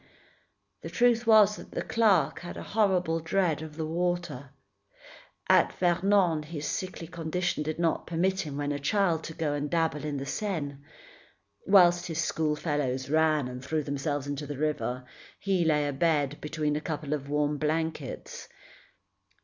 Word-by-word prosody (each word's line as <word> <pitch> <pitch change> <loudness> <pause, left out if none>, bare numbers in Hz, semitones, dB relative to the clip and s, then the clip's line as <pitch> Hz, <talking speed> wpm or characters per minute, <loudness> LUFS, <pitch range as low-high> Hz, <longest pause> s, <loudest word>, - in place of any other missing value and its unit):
The - - -6
truth 240 -1 +2
was 210 -2 +6
that - - -12
the - - -2
clerk 195 -10 +2
had 175 +1 -8
a - - -6
horrible 185 -6 +1
dread 165 -1 0
of 155 -1 -8
the 160 - -2
water. 175 -5 -2 1.0
At - - +4
Vernon, 180 -2 +2
his 150 -1 -6
sickly 185 -2 -4
condition 175 0 -2
did 155 +1 -3
not 165 -1 0
permit 185 +3 0
him, 150 -5 -6
when 145 0 -1
a 145 - -2
child, 165 +1 +1
to 160 - -7
go 155 -3 -1
and 145 0 -2
dabble 160 -3 0
in 150 -2 -3
the 135 - -4
Seine. 150 -4 -3 0.9
Whilst 175 -2 +5
his 165 -2 -3
schoolfellows 150 -4 -1
ran 155 -3 +3
and 125 0 -7
threw 155 +2 -1
themselves 145 0 -2
into 145 +1 -4
the 145 -1 -5
river, 140 -4 -2 0.4
he 190 -3 +1
lay 150 -2 +2
abed 145 0 0
between 150 -1 -1
a 150 - -2
couple 150 -2 -3
of 140 -2 -4
warm 145 0 0
blankets. 155 -2 -3
155 Hz, 155 wpm, -28 LUFS, 145-175 Hz, 1.0 s, was